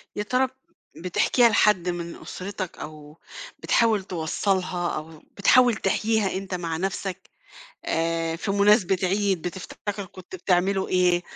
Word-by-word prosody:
يا 210 - -2
ترى 255 +4 +1
ب - - -19 0.5
بتحكيها 230 +7 +3
لحد 205 -4 +3
من 170 -1 -4
أسرتك 185 -1 -6
أو 150 0 -10 0.4
بتحاول 220 -4 +2
توصّلها 180 +1 -1
أو 155 0 -9 0.2
بتحاول 245 +3 +5
تحكيها 210 0 0
أنت 195 -1 -6
مع 165 -2 -3
نفسك، 190 +1 -4 0.6
آآ 165 0 -1
في 195 - -3
مناسبة 200 -1 +4
عيد 190 -1 +1
بتفتكر 195 +3 -5
كنت 185 0 -13
بتعملوا 190 +2 +1
إيه 180 -1 +3
185 Hz, 125 wpm, -25 LUFS, 175-205 Hz, 0.6 s, بتحاول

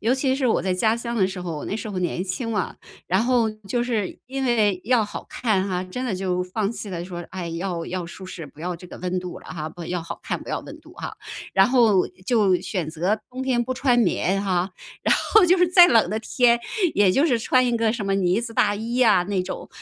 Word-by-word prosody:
尤 235 +4 +2
其 265 0 +1
是 270 -2 0
我 225 - +2
在 185 -1 0
家 220 +4 +2
乡 235 0 -4
的 190 - +3
时 190 -1 -6
候， 170 -3 -4
我 - - -6
那 205 - -3
时 220 0 -6
候 190 - -3
年 180 0 -1
轻 195 +5 -3
嘛， 210 -4 -2 0.3
然 190 +4 +2
后 240 -2 +2
就 215 +2 -3
是 225 -6 -2
因 270 +1 -3
为 210 -7 +2
要 240 -2 +3
好 205 - -7
看 200 -5 0
哈， 180 -1 -1
真 250 +8 -5
的 235 -6 -1
就 185 -1 -1
放 200 +3 -2
弃 220 -3 -7
了 170 -2 -4
说， 175 -1 -6
哎， 180 -2 -5
要 170 0 -3
要 185 -1 -3
舒 185 +2 -9
适， 170 -4 -7
不 145 +2 -16
要 180 +1 -3
这 180 - -12
个 - - -10
温 180 +1 -2
度 180 -1 -6
了 - - -16
哈。 155 -2 -5
不 170 - -7
要 175 -1 -2
好 165 - -7
看， - - -3
不 - - -12
要 - - -2
温 - - -11
度 - - -16
啊。 - - -6 0.4
然 195 0 +5
后 230 -7 +4 0.2
就 210 -6 +3
选 180 -7 -3
择 180 +7 0
冬 260 +1 -5
天 250 -2 +1
不 255 - -2
穿 250 -2 +2
棉 195 -2 +1
哈， 185 -1 0 0.3
然 - - +4 0.2
后 435 -3 +8
就 365 +2 +5
是 360 - +5
再 355 0 +8
冷 225 -6 +4
的 215 - -1
天， 235 +1 +3 0.4
也 200 -2 +5
就 275 +11 +3
是 245 -7 +2
穿 255 +2 +3
一 240 - +1
个 225 -1 +1
什 230 -3 -4
么 195 0 0
呢 190 +1 +2
子 235 -1 -6
大 205 0 +3
衣 230 +4 -2
啊 215 -6 +5
那 190 -1 -1
种。 185 - -6
205 Hz, 275 characters per minute, -23 LUFS, 180-240 Hz, 0.4 s, 后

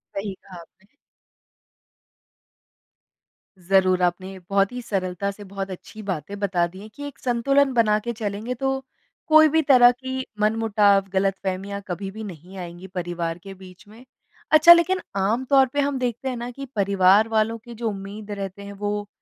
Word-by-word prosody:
सही 195 0 -3
कहा 180 -3 -12
आपने। 190 +4 -22 2.7
ज़रूर, 185 0 +2
आपने 185 +2 -1
बहुत 195 +1 +2
ही 250 0 -6
सरलता 190 -2 -2
से 205 +1 -12
बहुत 195 0 -6
अच्छी 215 +4 -10
बातें 195 +1 -4
बता 185 -4 +1
दी 185 +2 -13
है 215 - -10
कि 285 +6 -11
एक 285 - -11
संतुलन 270 +3 +2
बना 215 -3 +3
के 235 - -2
चलेंगे 215 +2 -4
तो, 270 +1 -2 0.4
कोई 310 0 +7
भी 320 +2 +3
तरह 250 -4 +6
की 260 +1 -5
मनमुटाव, 210 -2 +3
गलतफ़हमियाँ 195 +1 -2
कभी 190 +2 -4
भी 220 +2 -8
नहीं 185 0 -10
आएँगी 175 +1 -8
परिवार 175 -2 -4
के 195 - -9
बीच 185 +1 -15
में। 220 +4 -15 0.5
अच्छा, 310 +3 +10
लेकिन 355 +2 +2
आम 215 +7 0
तौर 270 -1 +5
पे 290 - 0
हम 280 -1 -1
देखते 250 +1 -2
हैं 250 - -3
ना 240 +1 -5
कि 275 +3 -8
परिवार 200 +1 +4
वालों 225 0 0
की 235 +1 -12
जो 230 0 -2
उम्मीद 205 +1 -8
रहते 195 -1 -6
हैं, 200 0 -8
वो 205 0 -3
205 Hz, 170 wpm, -23 LUFS, 190-240 Hz, 2.7 s, अच्छा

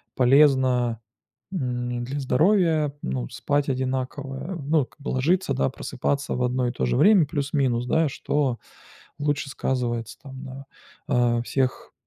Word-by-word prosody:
полезно, 130 -3 +4 0.5
м, 125 -7 -2
для 135 +4 -4
здоровья, 155 +2 +2
ну, 65 -2 -2
спать 145 0 -1
одинаково. 135 +4 -3
Ну, 145 -1 +2
как - - -27
бы 145 - -4
ложиться, 145 +3 +1
да, 135 - +1
просыпаться 140 +2 -2
в 125 - -1
одно 125 0 0
и - - -1
то 65 - -2
же - - +1
время 205 -6 +6
плюс-минус, 140 -5 0
да, 160 +2 +2
что 135 -2 -1 0.6
лучше 145 -1 -1
сказывается 120 -4 -2
там 135 -1 -9
на, 135 0 -9 0.4
а, 120 -1 +2
всех, 130 +1 -2
135 Hz, 140 wpm, -24 LUFS, 125-145 Hz, 0.6 s, время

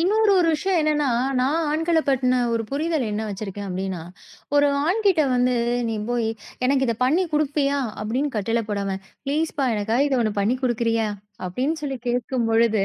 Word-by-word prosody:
இன்னொரு 420 +4 +3
ஒரு 340 -2 +3
விஷயம் 365 +3 0
என்னன்னா 300 -1 +1 0.3
நான் 310 +6 +1
ஆண்கள 325 +2 +1
பத்தின 255 -1 +2
ஒரு 230 0 0
புரிதல் 305 -1 0
என்ன 210 +1 -2
வச்சிருக்கேன் 200 0 -5
அப்படீன்னா, 185 -1 -3 0.6
ஒரு 290 - +5 0.2
ஆண்கிட்ட 385 -3 +3
வந்து 250 0 +2 0.3
நீ 225 - -1 0.2
போய், 235 -2 0 0.4
"எனக்கு 270 0 +2
இதை 230 - +1
பண்ணி 315 +8 +3
குடுப்பயா?" 290 -1 +1 0.2
அப்படீன்னு 255 +5 -1
கட்டளை 225 +3 0
போடாம, 200 -1 -1 0.3
"ப்ளீஸ் 310 +3 0
பா! 270 - +2
எனக்காக 225 +7 +1
இதை 265 -2 +1
ஒண்ணு 215 -2 0
பண்ணி 230 +6 +1
குடுக்குறியா?" 230 -3 +1 0.4
அப்படீன்னு 270 - -2
சொல்லி 270 -3 -3
கேட்கும் 245 0 0
பொழுது, 225 -3 +3
255 Hz, 165 wpm, -23 LUFS, 225-300 Hz, 0.6 s, ஒரு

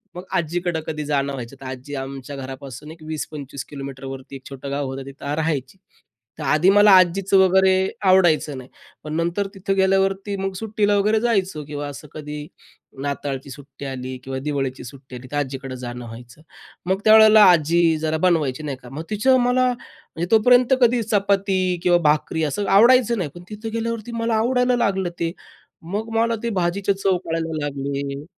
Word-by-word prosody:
मग 180 - -7
आज्जीकडं 175 0 -1
कधी 150 -1 -4
जाणं 140 -1 0
व्हायचं. 130 0 -7
तर - - -9
आजी 130 +2 -7
आमच्या 135 +1 -6
घरापासून 135 +2 -8
एक 160 -1 -14
20-25 145 -3 -6
किलोमीटरवरती 135 -1 -8
एक 130 - -11
छोटं 135 0 -7
गाव 140 0 -2
होतं, 135 0 -6
तिथं 140 +1 -6
राहायची. 155 -1 -2 0.6
तर 150 - -4
आधी 155 +6 +4
मला 205 +1 +6
आजीचं 185 +2 +3
वगैरे 190 0 +5 0.4
आवडायचं 165 -6 +3
नाही 130 0 -10 0.3
पण 150 0 -6
नंतर 170 +4 -1
तिथं 195 +1 -2
गेल्यावरती 195 +1 +1
मग 195 0 -2
सुट्टीला 210 0 0
वगैरे 210 +2 +2
जायचो 195 -9 0
किंवा 145 0 -5
असं 145 +1 -9
कधी 150 -1 -7 0.6
नाताळची 140 -1 -4
सुट्टी 140 0 -11
आली 130 -1 -5
किंवा 135 0 -4
दिवाळीची 135 -3 -2
सुट्टी 130 +1 -11
आली, 125 +1 -9
तर 145 - -2
आज्जीकडं 135 -2 -4
जाणं 120 0 -6
व्हायचं. 120 +4 -12 0.4
मग 190 +1 0
त्यावेळेला 220 0 +8
आजी 170 0 +3 0.2
जरा 160 0 0
बनवायची 155 -5 0
नाही 140 -3 -4
का. 125 - -11
मग 145 +5 -6
तिचं 235 +5 +3
मला 250 +1 +2
म्हणजे 175 -7 -8
तोपर्यंत 245 +3 +5
कधी 240 0 +4
चपाती 200 -1 +2 0.3
किंवा 175 -1 +5
भाकरी 155 +1 0
असं 190 +7 -2
आवडायचं 240 +1 +5
नाही. 170 -6 -2
पण 175 - -10
तिथं 215 +1 -6
गेल्यावरती 230 0 -3
मला 230 -1 0
आवडायला 250 +2 +2
लागलं 195 -6 0
ते, 165 -1 -1 0.6
मग 220 +3 -3
मला 230 0 +2
ते 235 - 0
भाजीच्या 195 +3 0
चव 195 -2 +1
कळायला 165 -1 -2
लागले 140 0 -3
हं, 140 +2 -8
160 Hz, 170 wpm, -22 LUFS, 140-200 Hz, 0.6 s, त्यावेळेला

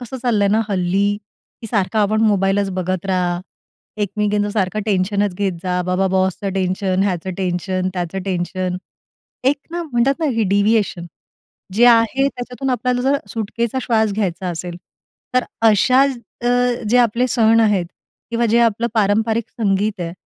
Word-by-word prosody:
कसं 245 +1 -7
चाललंय 215 -5 +2
ना 215 +2 +3
हल्ली 195 +1 +1 0.4
की 225 - -7
सारखा 215 0 0
आपण 215 +1 +2
मोबाईलच 200 -2 +2
बघत 185 0 -3
राहा, 180 -2 0 0.6
एकमेकींचं 205 +1 0
सारखं 205 0 -1
टेन्शनच 200 0 0
घेत 195 0 -1
जा, 180 -1 -1
बाबा 185 +2 0
बॉसचं 190 +1 0
टेन्शन, 185 0 0
ह्याचं 190 -2 -1
टेन्शन, 185 0 -1
त्याचं 180 +1 -3
टेन्शन. 185 -1 -2 0.7
एक 275 +3 +3
ना 345 +1 -3
म्हणतात 270 -3 +1
ना, 320 - +1
हे 225 - +2
डिव्हिएशन. 200 -3 +1 0.7
जे 230 +4 +5
आहे, 235 +3 +4
त्याच्यातून 250 0 -5
आपल्याला 250 0 0
जर 275 +2 +2
सुटकेचा 230 +3 -2
श्वास 220 -3 +1
घ्यायचा 190 -3 -2
असेल, 175 0 -5 0.6
तर 255 - +3 0.2
अशा 255 +5 +4 0.4
अ, - - +2 0.4
जे 240 - +3
आपले 240 +1 +2
सण 225 -1 +4
आहेत 205 -5 +2 0.4
किंवा 235 0 +1
जे 230 +1 +3
आपलं 230 0 +2
पारंपरिक 220 +2 +1
संगीत 205 -1 -1
आहे, 170 -1 -3
205 Hz, 150 wpm, -19 LUFS, 185-230 Hz, 0.7 s, जे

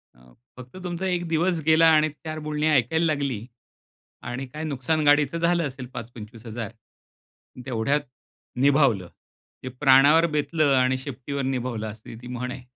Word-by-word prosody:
अ, 60 0 -21 0.3
फक्त 125 +7 -11
तुमचा 180 +1 -4
एक 175 -1 -1
दिवस 165 +1 +1
गेला 160 +1 +5
आणि 155 0 +4
4 155 +1 -8
बोलणी 150 +1 0
ऐकायला 150 +4 +2
लागली 140 -8 -1 0.9
आणि 130 +2 -4
काय 150 +5 -7
नुकसान 155 +1 -1
गाडीचं 145 +2 +3
झालं 170 -2 +1
असेल 130 -1 -8
5-25,000 115 -1 -8 0.9
तेवढ्यात 130 +4 0 0.6
निभावलं. 135 - +3 0.6
जे 130 - -4
प्राणावर 145 +4 +6
बेतलं 150 -1 +1
आणि 130 0 +2
शेपटीवर 140 +1 -5
निभावलं, 125 -4 -2
अशी 110 +1 -11
ती 120 - -10
म्हण 125 0 -4
आहे. 125 - -9
140 Hz, 140 wpm, -24 LUFS, 125-155 Hz, 0.9 s, प्राणावर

